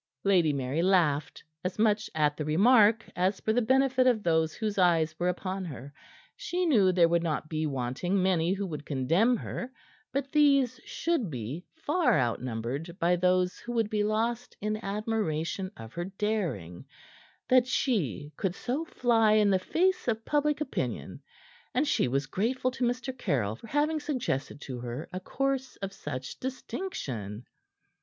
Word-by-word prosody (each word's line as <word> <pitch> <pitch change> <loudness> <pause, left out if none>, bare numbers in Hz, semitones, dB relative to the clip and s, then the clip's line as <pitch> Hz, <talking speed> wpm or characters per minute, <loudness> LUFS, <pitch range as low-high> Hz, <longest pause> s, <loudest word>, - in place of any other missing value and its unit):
Lady 180 -6 +4
Mary 140 +2 -1
laughed, 165 -6 +2 0.2
as 180 0 -3
much 215 -1 +2
at 150 -1 +2
the 155 - -3
remark 215 - +5
as 185 +2 +1
for 220 - 0
the 245 - +3
benefit 260 +2 +3
of 230 -4 +3
those 160 -1 +2
whose 215 -3 -2
eyes 165 -3 +3
were 175 +1 +2
upon 185 +1 -3
her. 145 -4 -8 0.4
She 360 +1 -2
knew 210 - +4
there 175 -2 +5
would 170 0 +2
not 155 -2 -2
be 155 -1 -1
wanting 140 +8 -1
many 180 -2 +2
who 200 +1 -1
would 150 -5 -5
condemn 165 - +2
her; 245 +3 -5 0.4
but 275 0 -2
these 275 -5 +4
should 330 - -1
be 130 +6 -5
far 320 - +2
outnumbered 125 +7 -3
by 175 -1 +3
those 180 0 +1
who 240 - -6
would 225 -3 0
be 210 -1 +1
lost 230 +3 -1
in 215 +1 -2
admiration 195 -4 -2
of 115 +1 -10
her 175 0 -3
daring, 190 - -3 0.6
that 255 -1 +5
she 155 - -1
could 190 -3 -1
so 260 +9 -2
fly 230 -8 +3
in 210 -2 +4
the 190 - +3
face 365 - +1
of 225 -1 -1
public 295 0 +1
opinion; 300 - -3 0.5
and 280 +4 +2
she - - +2
was 135 +3 0
grateful 240 - -1
to 255 0 -4
Mr. 250 +2 -1
Caryll 130 - -1
for 180 - -13
having 300 +5 +1
suggested 240 - -2
to 130 -3 -6
her 120 +4 -5
a 185 - -3
course 270 +6 -2
of 195 0 -6
such 135 -6 -6
distinction. 125 - -5
195 Hz, 165 wpm, -29 LUFS, 155-245 Hz, 0.6 s, remark